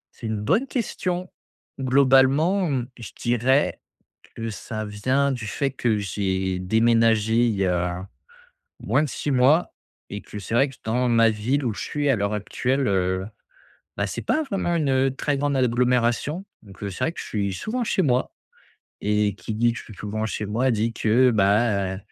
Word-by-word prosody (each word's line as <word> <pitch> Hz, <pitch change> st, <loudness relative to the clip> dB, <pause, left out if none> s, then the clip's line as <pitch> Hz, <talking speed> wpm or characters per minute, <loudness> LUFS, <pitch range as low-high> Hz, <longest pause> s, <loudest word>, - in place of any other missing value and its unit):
C'est 115 Hz, -, -7 dB
une 110 Hz, -1 st, -2 dB
bonne 190 Hz, -, +1 dB
question. 185 Hz, -7 st, -2 dB, 0.5 s
Globalement, 135 Hz, +7 st, +4 dB
mmh, 130 Hz, -4 st, -1 dB
je 115 Hz, -, -7 dB
dirais 125 Hz, +4 st, +1 dB, 0.5 s
que 115 Hz, 0 st, -4 dB
ça 110 Hz, 0 st, -5 dB
vient 130 Hz, +7 st, 0 dB
du 120 Hz, -4 st, -4 dB
fait 135 Hz, +5 st, -1 dB
que 120 Hz, -4 st, 0 dB
j'ai 95 Hz, -1 st, -2 dB
déménagé 110 Hz, +2 st, +3 dB
il 110 Hz, -, 0 dB
y 95 Hz, -1 st, +1 dB
a 90 Hz, +1 st, -2 dB, 0.7 s
moins -, -, +1 dB
de 145 Hz, -, -2 dB
6 145 Hz, -, -3 dB
mois 135 Hz, +7 st, +3 dB, 0.4 s
et 100 Hz, -, -5 dB
que 105 Hz, -, -10 dB
c'est 105 Hz, +3 st, -6 dB
vrai 135 Hz, +4 st, +3 dB
que 135 Hz, -, -13 dB
dans 125 Hz, +3 st, 0 dB
ma 115 Hz, -1 st, +4 dB
ville 125 Hz, +6 st, -1 dB
où 115 Hz, -, 0 dB
je -, -, -7 dB
suis, 145 Hz, -1 st, -1 dB
à 130 Hz, -, +4 dB
l'heure 100 Hz, 0 st, -1 dB
actuelle, 130 Hz, +6 st, -1 dB
heu, 95 Hz, -1 st, 0 dB, 0.7 s
bah 100 Hz, -, +1 dB
c'est 90 Hz, -, -5 dB
pas 315 Hz, -, +1 dB
vraiment 195 Hz, -8 st, -1 dB
une, 150 Hz, -4 st, 0 dB
heu, 135 Hz, 0 st, +2 dB
très 145 Hz, +1 st, -1 dB
grande 140 Hz, 0 st, 0 dB
agglomération. 125 Hz, -, +1 dB, 0.2 s
Donc, 100 Hz, -2 st, -15 dB
heu, 100 Hz, -, -2 dB
c'est 90 Hz, -, -3 dB
vrai 165 Hz, -, 0 dB
que -, -, -8 dB
je -, -, -7 dB
suis 100 Hz, -2 st, -2 dB
souvent 235 Hz, -, -3 dB
chez 195 Hz, -, 0 dB
moi 125 Hz, -4 st, +1 dB, 0.7 s
et 105 Hz, -1 st, +1 dB
qui 110 Hz, 0 st, -6 dB
dit 120 Hz, +1 st, +3 dB
que -, -, -6 dB
je -, -, -10 dB
suis 110 Hz, -, -12 dB
souvent 110 Hz, +2 st, -3 dB
chez 105 Hz, -, -3 dB
moi, 120 Hz, +6 st, 0 dB
dit, 115 Hz, +1 st, 0 dB
que 120 Hz, +4 st, +3 dB
bah, 100 Hz, -2 st, +2 dB
115 Hz, 185 wpm, -24 LUFS, 105-135 Hz, 0.7 s, Globalement